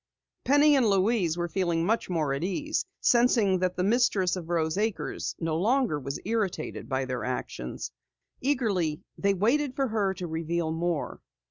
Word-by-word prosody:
Penny 290 +2 +5
and 250 -5 +3
Louise 195 -4 +2
were 175 0 -1
feeling 170 -1 0
much 225 +2 0
more 155 -6 0
at 140 +4 -3
ease, 245 - -1 0.2
sensing 235 -6 +4
that 180 0 0
the 180 - +1
mistress 200 -4 +2
of 170 -3 -7
Rose 160 -2 0
Acres 215 0 -2
no 165 -2 -1
longer 225 - +2
was 140 +1 -5
irritated 205 -7 -2
by 130 0 0
their 125 -1 -3
actions. 60 - -4 0.5
Eagerly 205 - 0 0.2
they 200 0 +2
waited 255 +7 +1
for 270 -2 0
her 200 -3 0
to 180 - -5
reveal 165 0 -2
more. 165 -1 -2
185 Hz, 160 wpm, -28 LUFS, 165-225 Hz, 0.5 s, Penny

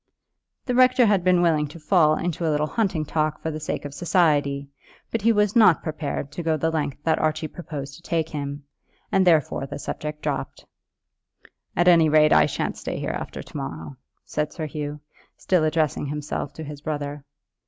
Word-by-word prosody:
The 250 - -1
rector 255 0 +5
had 200 -4 +3
been 180 -1 +4
willing 155 -3 +2
to 150 +4 -11
fall 155 -1 +4
into 175 -1 -3
a 160 - +1
little 150 0 +1
hunting 180 -4 -1
talk 155 0 -1
for 160 - -3
the 155 - -5
sake 155 - -4
of 145 - -6
society, 145 -4 +1 0.4
but 230 - -1
he 230 +3 +4
was 210 -1 +2
not 215 -8 +6
prepared 150 -3 -4
to 175 - -5
go 160 -1 +1
the 160 +2 0
length 145 -4 -2
that 160 - +2
Archie 155 0 0
proposed 145 -5 -7
to - - -17
take 165 -2 -1
him, 145 -1 -5 0.5
and 190 -1 +3
therefore 155 -4 +2
the - - -6
subject 150 +1 -5
dropped. - - -3 1.1
"At 175 +1 +2
any 165 -3 +6
rate 155 0 +5
I - - +6
shan't - - -3
stay - - -4
here - - -2
after - - -6
to - - -17
morrow," 80 0 -6 0.3
said 150 0 -2
Sir 160 - -5
Hugh, 150 0 -5 0.4
still 180 -4 +1
addressing 155 -2 0
himself 150 -1 -4
to 160 - -7
his 145 -1 -8
brother. 145 -1 -4
155 Hz, 190 wpm, -24 LUFS, 145-175 Hz, 1.1 s, not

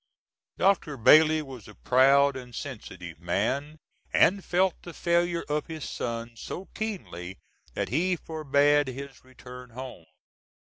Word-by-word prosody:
Dr. 185 -7 +2
Bailey 155 +6 +6
was 130 -7 -10
a 105 - -13
proud 140 +2 +4
and 125 -2 -9
sensitive 95 - -8
man, 115 - -1 0.3
and 195 +1 +4
felt 185 0 +1
the 175 - -10
failure 170 0 +1
of 150 0 -2
his 160 -3 -6
son 115 0 -4
so 180 - -7
keenly 95 - -5 0.4
that - - -2
he 180 +8 +1
forbade 145 -3 +2
his 135 +1 -8
return 125 -1 -12
home. 125 -7 -9
140 Hz, 130 wpm, -27 LUFS, 125-160 Hz, 0.4 s, Bailey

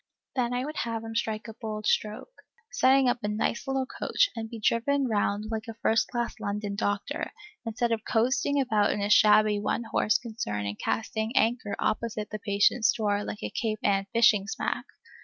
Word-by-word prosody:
Then 245 -2 0
I 250 +1 -1
would 305 +1 -6
have 230 -1 -2
him 225 0 -6
strike 220 -1 -2
a 225 - -7
bold 215 -1 -6
stroke, 215 - -1 0.3
set 270 -1 +4
up 245 -1 +2
a 210 - -2
nice 215 +5 -1
little 270 -1 0
coach, - - +1
and 225 -1 -5
be 230 - -7
driven 260 +6 +1
round 210 -1 -1
like 220 +1 -3
a 225 - -7
first 225 0 +2
class 240 -2 -3
London 205 -1 -3
doctor, 205 -1 -2 0.4
instead 235 +1 -1
of 220 -1 -1
coasting 260 +5 +1
about 215 -6 +2
in - - -3
a 205 +1 0
shabby 210 -1 +5
one 210 +3 -1
horse 215 -1 +2
concern 215 - -4
and 100 +1 -4
casting 220 +2 -2
anchor 230 -5 +1
opposite 215 -1 -2
his 215 -1 -5
patients' 210 +2 +3
doors 205 -2 -1
like 210 - -6
a - - -3
Cape 220 -2 -2
Ann 195 -1 +1
fishing 210 -4 +4
smack. - - -2
220 Hz, 190 wpm, -28 LUFS, 210-240 Hz, 0.4 s, shabby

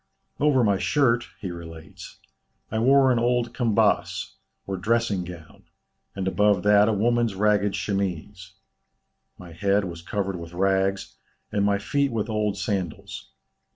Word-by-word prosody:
"Over 140 -3 +3
my 100 -3 +2
shirt" 120 -5 +1
he 95 - -4
relates, 80 -2 -11 0.5
"I 110 - -1
wore 135 +2 +5
an 120 - +2
old 120 0 0
kambas, 115 -3 +1 0.3
or 100 - -3
dressing 105 0 0
gown, 85 -3 -12 0.5
and 95 -1 -3
above 105 -1 +2
that 105 +1 +5
a - - +2
woman's 115 0 +1
ragged 105 0 +2
chemise; 95 -1 -4 0.8
my 90 -2 -12
head 100 +4 +1
was 85 -2 -7
covered 95 +1 -3
with 85 0 -9
rags, 95 +1 0 0.3
and 100 - 0
my 100 0 +2
feet 140 +7 0
with 110 -1 -2
old 105 -2 -1
sandals. 95 -7 -4
100 Hz, 140 wpm, -24 LUFS, 95-115 Hz, 0.8 s, wore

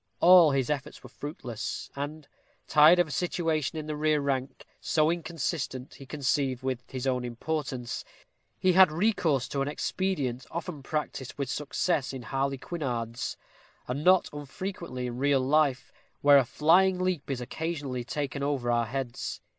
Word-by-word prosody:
All 175 -2 +8
his 135 -1 0
efforts 140 -3 -4
were - - -11
fruitless; 120 -6 -6
and, 145 +1 -5 0.4
tired 155 +3 +7
of 175 -2 +3
a - - -8
situation 160 -2 -1
in 155 - -4
the 155 0 -3
rear 155 0 +2
rank, 135 -2 -2
so 155 0 +2
inconsistent, 160 -5 -3
he 135 - -12
conceived, 135 -3 -1
with 130 -2 -2
his 130 -1 -5
own 125 -2 0
importance, 125 0 -3 0.5
he 185 -1 +3
had 185 -2 +7
recourse 160 - +1
to 140 - -1
an 135 - 0
expedient 145 -5 -2
often 170 -3 -5
practised 140 -2 -4
with 140 -3 -2
success 150 -1 -1
in 130 -2 -6
harlequinades, 135 -2 -3 0.5
and 140 +4 -3
not 185 +1 +5
unfrequently 145 -2 -5
in 120 0 -5
real 140 0 +3
life, 135 -1 +2 0.3
where 145 -1 +7
a 130 - +1
flying 180 +8 +4
leap 185 -6 -1
is 135 -3 -2
occasionally 140 -1 -4
taken 140 +2 -3
over 140 -4 0
our 120 -1 +1
heads. 130 0 -4
145 Hz, 155 wpm, -28 LUFS, 130-160 Hz, 0.5 s, All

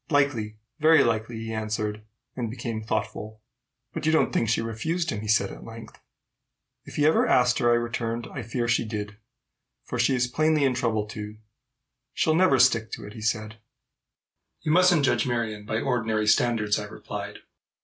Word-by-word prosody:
"Likely 135 -8 +1 0.2
very 160 +1 +6
likely," 115 0 -1
he 115 0 -5
answered, 110 -1 -3 0.3
and 120 -3 -3
became 115 -1 -4
thoughtful. 110 0 -4 0.5
"But 155 - -3
you - - +4
don't 160 - +2
think 115 - +1
she 115 - +2
refused 155 +10 -2
him?" 105 - -4
he 110 - -6
said 110 0 +2
at - - -10
length. 115 0 -11 0.9
"If - - -11
he 145 - +2
ever 155 - +4
asked 125 0 +3
her," 120 - +3
I 120 - +5
returned, 120 -1 -2
"I 135 - -4
fear 120 +1 -2
she 115 0 +2
did; 105 -2 -5 0.7
for 125 - -5
she 125 +3 +3
is 125 0 +2
plainly 155 +4 +1
in 135 -2 +3
trouble 115 -4 0
too." 105 0 -8 0.8
"She'll 155 - +2
never 165 -5 +4
stick 115 -3 +3
to 110 - -6
it," 105 - -10
he 110 - -9
said. 110 0 -2 1.0
"You 155 - 0
mustn't 175 -3 +5
judge 130 - +1
Marion 110 -4 -2
by 110 - -1
ordinary 115 -4 0
standards," 110 -1 +2
I - - -5
replied. - - -7
115 Hz, 180 wpm, -26 LUFS, 110-130 Hz, 1.0 s, very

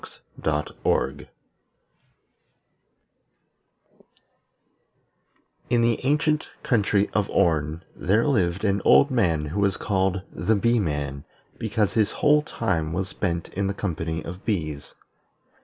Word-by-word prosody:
In 120 -1 +3
the 115 0 +1
ancient 150 +2 +1
country 105 -3 +2
of 105 -1 0
Orn, 80 0 +1
there 105 +5 +1
lived 100 - +1
an 100 -1 +1
old 140 - +6
man 85 -11 +1
who 80 +7 -3
was 100 -1 +1
called 95 -1 0
the 110 - +1
Bee 115 +3 +2
man, 70 -6 -3 0.4
because 110 -2 0
his 110 -3 +1
whole 150 -2 +4
time 85 - -2
was 95 +1 -2
spent 85 -3 -3
in 100 +1 -2
the 100 - -2
company 80 -5 -3
of 90 +3 -8
bees. 80 -9 -3
100 Hz, 105 wpm, -24 LUFS, 85-110 Hz, 0.4 s, old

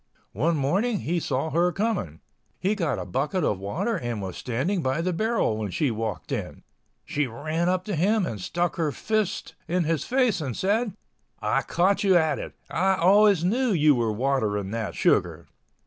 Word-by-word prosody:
One 160 - +1
morning 195 - +1
he 175 +2 0
saw 155 0 -2
her 175 +2 +2
coming. 190 - -2 0.4
He 195 +3 +1
got 170 -9 -1
a - - -4
bucket 150 +7 -1
of 100 - 0
water 100 - -2
and 120 -3 -3
was 95 -3 -5
standing 140 - -1
by 130 +2 0
the 180 +2 0
barrel 215 - 0
when 105 -2 -3
she 135 - 0
walked 110 -3 -4
in. - - -4 0.4
She 145 -1 -1
ran 155 +9 -2
up 185 0 0
to 205 - -2
him 195 +5 +2
and 110 - -5
stuck 175 - -1
her 160 -3 0
first 215 +3 -2
in 180 +1 +1
his 160 -1 0
face 250 -8 +1
and 130 -6 -4
said, 205 +1 0 0.4
"I - - +1
caught 190 +4 +1
you 190 -3 +5
at 160 -4 +1
last—I 190 +1 -1
always 195 0 +5
knew 235 +5 +2
you 155 -3 +5
were 120 -4 0
watering 105 -5 0
that 110 -2 -3
sugar!" - - +1
165 Hz, 180 wpm, -25 LUFS, 125-195 Hz, 0.4 s, you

